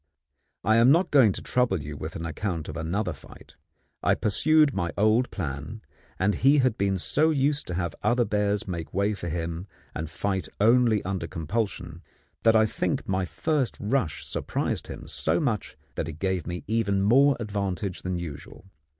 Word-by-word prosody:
I 110 Hz, +4 st, +4 dB
am 115 Hz, +2 st, +6 dB
not 170 Hz, +6 st, +4 dB
going 130 Hz, -8 st, +6 dB
to -, -, -6 dB
trouble 125 Hz, -7 st, +1 dB
you 75 Hz, 0 st, -7 dB
with 80 Hz, +2 st, -6 dB
an 80 Hz, -, -4 dB
account 85 Hz, 0 st, -3 dB
of -, -, -6 dB
another 90 Hz, +3 st, -2 dB
fight. 70 Hz, -, -15 dB, 0.5 s
I -, -, +3 dB
pursued 150 Hz, +7 st, +3 dB
my 85 Hz, -4 st, -1 dB
old 110 Hz, +4 st, +3 dB
plan, 75 Hz, +5 st, -5 dB, 0.3 s
and 100 Hz, +2 st, +2 dB
he 140 Hz, +7 st, +4 dB
had 130 Hz, -5 st, +3 dB
been 100 Hz, -1 st, 0 dB
so 150 Hz, -, +2 dB
used 145 Hz, -1 st, +1 dB
to 90 Hz, -, -3 dB
have 85 Hz, -3 st, -2 dB
other 120 Hz, 0 st, +2 dB
bears 105 Hz, -1 st, 0 dB
make 85 Hz, -3 st, -5 dB
way 100 Hz, +2 st, +2 dB
for 90 Hz, -4 st, -5 dB
him, 85 Hz, +2 st, -4 dB, 0.3 s
and 80 Hz, +2 st, -4 dB
fight 95 Hz, +3 st, -2 dB
only 115 Hz, -1 st, +4 dB
under 95 Hz, -3 st, -3 dB
compulsion, 85 Hz, 0 st, -3 dB, 0.4 s
that 115 Hz, 0 st, +4 dB
I 110 Hz, 0 st, +6 dB
think 110 Hz, -, -2 dB
my 95 Hz, -1 st, 0 dB
first 145 Hz, -, -1 dB
rush 105 Hz, -, -1 dB
surprised -, -, -2 dB
him -, -, -8 dB
so -, -, 0 dB
much 120 Hz, -, -2 dB, 0.2 s
that -, -, -3 dB
it -, -, -8 dB
gave 95 Hz, -1 st, -1 dB
me 90 Hz, 0 st, -4 dB
even 100 Hz, -3 st, +1 dB
more 135 Hz, +7 st, +5 dB
advantage 100 Hz, -3 st, -3 dB
than 90 Hz, -1 st, -2 dB
usual. 80 Hz, +1 st, -8 dB
100 Hz, 175 wpm, -26 LUFS, 85-115 Hz, 0.5 s, am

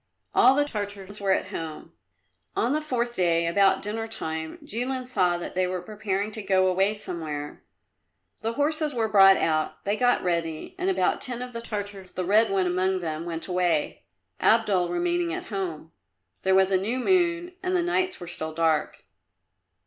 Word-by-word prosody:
All 260 Hz, +2 st, +6 dB
the 290 Hz, +1 st, +3 dB
Tartars 205 Hz, -4 st, -5 dB
were 195 Hz, -1 st, +1 dB
at -, -, +1 dB
home. 160 Hz, -2 st, -6 dB, 0.6 s
On 240 Hz, -, +1 dB
the 305 Hz, +2 st, +1 dB
fourth 240 Hz, -5 st, -2 dB
day, 170 Hz, -2 st, +2 dB
about 195 Hz, +3 st, +3 dB
dinner 225 Hz, +2 st, -3 dB
time, 160 Hz, -7 st, -5 dB
Jilin 255 Hz, +3 st, -2 dB
saw 185 Hz, -8 st, +1 dB
that 175 Hz, -, -6 dB
they 185 Hz, 0 st, +1 dB
were 185 Hz, 0 st, -2 dB
preparing 205 Hz, +1 st, -3 dB
to 215 Hz, -, -4 dB
go 190 Hz, -2 st, +2 dB
away 190 Hz, +3 st, +2 dB
somewhere. 155 Hz, -7 st, -5 dB, 0.8 s
The 225 Hz, +1 st, -2 dB
horses 300 Hz, +1 st, +1 dB
were 225 Hz, -2 st, +1 dB
brought 195 Hz, -2 st, +7 dB
out, 155 Hz, -1 st, -1 dB
they 200 Hz, +1 st, +1 dB
got 245 Hz, +2 st, +2 dB
ready, 165 Hz, -3 st, -2 dB
and 370 Hz, +1 st, 0 dB
about 380 Hz, -, +1 dB
ten 245 Hz, -1 st, -2 dB
of 250 Hz, 0 st, -8 dB
the 230 Hz, -, -5 dB
Tartars, 205 Hz, -4 st, -5 dB
the 185 Hz, -, -3 dB
red 215 Hz, +4 st, +4 dB
one 195 Hz, -1 st, +1 dB
among 185 Hz, +1 st, 0 dB
them, 160 Hz, -1 st, -4 dB
went 165 Hz, -1 st, -4 dB
away, 175 Hz, -4 st, 0 dB, 0.4 s
Abdul 205 Hz, -6 st, +3 dB
remaining 175 Hz, -1 st, 0 dB
at -, -, -7 dB
home. 175 Hz, -6 st, -4 dB, 0.5 s
There 190 Hz, 0 st, +3 dB
was 190 Hz, 0 st, +4 dB
a 190 Hz, -, +4 dB
new 225 Hz, +6 st, -1 dB
moon 350 Hz, +4 st, +1 dB
and 370 Hz, 0 st, -1 dB
the 355 Hz, -, +2 dB
nights 365 Hz, +2 st, 0 dB
were 175 Hz, -, -8 dB
still 160 Hz, -2 st, -5 dB
dark. 160 Hz, -2 st, 0 dB
195 Hz, 180 wpm, -26 LUFS, 175-235 Hz, 0.8 s, brought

